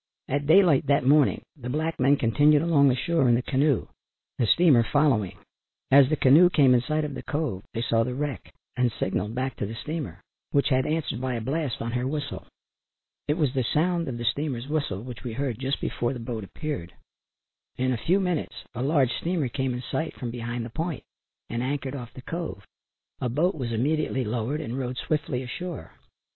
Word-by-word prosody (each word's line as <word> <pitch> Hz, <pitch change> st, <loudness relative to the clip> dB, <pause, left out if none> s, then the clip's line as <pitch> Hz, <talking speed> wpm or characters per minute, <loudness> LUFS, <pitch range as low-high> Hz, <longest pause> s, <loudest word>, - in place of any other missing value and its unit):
At 145 Hz, +1 st, -1 dB
daylight 160 Hz, -5 st, +5 dB
that 140 Hz, -2 st, +3 dB
morning 145 Hz, +1 st, +4 dB
the 125 Hz, -4 st, -7 dB
black 155 Hz, +4 st, -2 dB
men 135 Hz, +3 st, +4 dB
continued 145 Hz, +5 st, +4 dB
along 150 Hz, -4 st, +4 dB
the 125 Hz, -, +2 dB
shore 135 Hz, 0 st, +1 dB
in 120 Hz, -, +5 dB
the 120 Hz, -, 0 dB
canoe, 140 Hz, 0 st, +1 dB, 0.5 s
the 120 Hz, -, +2 dB
steamer 155 Hz, -3 st, +5 dB
following. 115 Hz, -7 st, +1 dB, 0.5 s
As 135 Hz, -1 st, +7 dB
the 155 Hz, -, +2 dB
canoe 150 Hz, +6 st, +6 dB
came 140 Hz, -7 st, +5 dB
in 120 Hz, -, +4 dB
sight 155 Hz, +4 st, -1 dB
of 145 Hz, -, -5 dB
the -, -, -6 dB
cove 145 Hz, -11 st, -2 dB
they 115 Hz, -, -1 dB
saw 115 Hz, -1 st, +2 dB
the 125 Hz, +1 st, -3 dB
wreck 140 Hz, -, -4 dB, 0.2 s
and 125 Hz, -1 st, +2 dB
signalled 105 Hz, +2 st, -2 dB
back 130 Hz, 0 st, -2 dB
to 100 Hz, -, -2 dB
the 110 Hz, -, -6 dB
steamer, 140 Hz, -, -5 dB, 0.3 s
which 140 Hz, 0 st, +2 dB
had 130 Hz, -1 st, +2 dB
answered 155 Hz, -6 st, -2 dB
by 130 Hz, -1 st, -1 dB
a -, -, -2 dB
blast 135 Hz, +1 st, -2 dB
on 115 Hz, -, -3 dB
her 125 Hz, +2 st, -1 dB
whistle. 145 Hz, 0 st, -4 dB, 0.8 s
It 150 Hz, -, +2 dB
was 145 Hz, -6 st, +1 dB
the 130 Hz, -2 st, +1 dB
sound 170 Hz, +6 st, +1 dB
of 125 Hz, -3 st, -4 dB
the 120 Hz, -, -5 dB
steamer's 130 Hz, 0 st, -1 dB
whistle 140 Hz, -10 st, -2 dB
which 125 Hz, -1 st, -8 dB
we 120 Hz, -3 st, -4 dB
heard 125 Hz, -2 st, -2 dB
just 135 Hz, +1 st, -1 dB
before 120 Hz, +2 st, -2 dB
the 125 Hz, -, -6 dB
boat 115 Hz, -2 st, -5 dB
appeared. 95 Hz, -, -5 dB, 0.8 s
In 130 Hz, +1 st, +1 dB
a 125 Hz, -, 0 dB
few 185 Hz, +4 st, +4 dB
minutes 180 Hz, -5 st, -1 dB, 0.2 s
a 120 Hz, -, -4 dB
large 135 Hz, -2 st, +2 dB
steamer 165 Hz, -6 st, -1 dB
came 130 Hz, +1 st, -1 dB
in 125 Hz, -, -5 dB
sight 160 Hz, +5 st, -3 dB
from 120 Hz, -3 st, -5 dB
behind 120 Hz, 0 st, -4 dB
the 115 Hz, -, -8 dB
point 160 Hz, 0 st, -3 dB, 0.4 s
and 115 Hz, -, -3 dB
anchored 135 Hz, +1 st, -2 dB
off 120 Hz, -3 st, -7 dB
the 130 Hz, -, -10 dB
cove. 165 Hz, -, -5 dB, 0.5 s
A 125 Hz, -, -1 dB
boat 160 Hz, +10 st, +1 dB
was 125 Hz, -6 st, -4 dB
immediately 135 Hz, +3 st, 0 dB
lowered 120 Hz, +7 st, -2 dB
and 130 Hz, -3 st, -4 dB
rowed 125 Hz, -1 st, -3 dB
swiftly 140 Hz, -4 st, -2 dB
ashore. 170 Hz, +6 st, -6 dB
130 Hz, 205 wpm, -26 LUFS, 120-150 Hz, 0.8 s, As